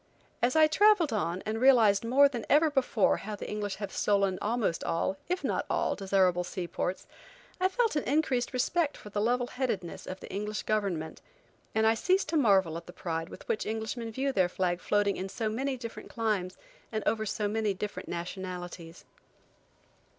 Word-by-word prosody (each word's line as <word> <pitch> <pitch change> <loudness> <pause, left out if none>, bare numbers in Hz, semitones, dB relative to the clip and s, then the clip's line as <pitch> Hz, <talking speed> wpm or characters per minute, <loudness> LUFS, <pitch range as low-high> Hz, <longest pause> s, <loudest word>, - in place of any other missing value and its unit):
As 245 +3 +2
I 315 0 +7
traveled 355 - +4
on 185 -3 -1
and 220 +2 -2
realized 230 -7 +5
more 265 +5 +5
than 245 -5 -5
ever 305 +2 +5
before 255 -7 +2
how 210 +1 -6
the - - -7
English 205 -2 -3
have 200 -1 -5
stolen 200 -2 +1
almost 215 -6 0
all, 165 +3 0
if 365 +1 -1
not - - 0
all, - - +1
desirable 190 -2 +2
sea 180 0 -5
ports, 180 +2 -3 0.5
I 370 - +4
felt 460 0 +1
an 295 - +1
increased 265 -4 +1
respect 290 +5 0
for 210 - -11
the 205 - -1
level 245 +3 +1
headedness 235 -9 -3
of 185 - -6
the - - -10
English 210 +2 -3
government, 195 -7 -2 0.5
and 220 0 +3
I 220 - +5
cease 375 - +2
to 330 - -3
marvel 195 - +3
at 170 - -10
the 175 - -10
pride 165 -1 -4
with - - -12
which 215 - -1
Englishmen 225 +1 -3
view 270 +4 -1
their 185 -8 +2
flag 180 -1 -1
floating 205 -1 +1
in 190 +1 -4
so 225 +1 -2
many 260 +4 -2
different 230 -2 -8
climes 210 -6 -1 0.3
and 215 -2 -2
over 220 -1 +1
so 210 0 -1
many 210 -1 0
different 210 +2 -5
nationalities. 175 -1 -6
215 Hz, 185 wpm, -29 LUFS, 190-250 Hz, 0.5 s, I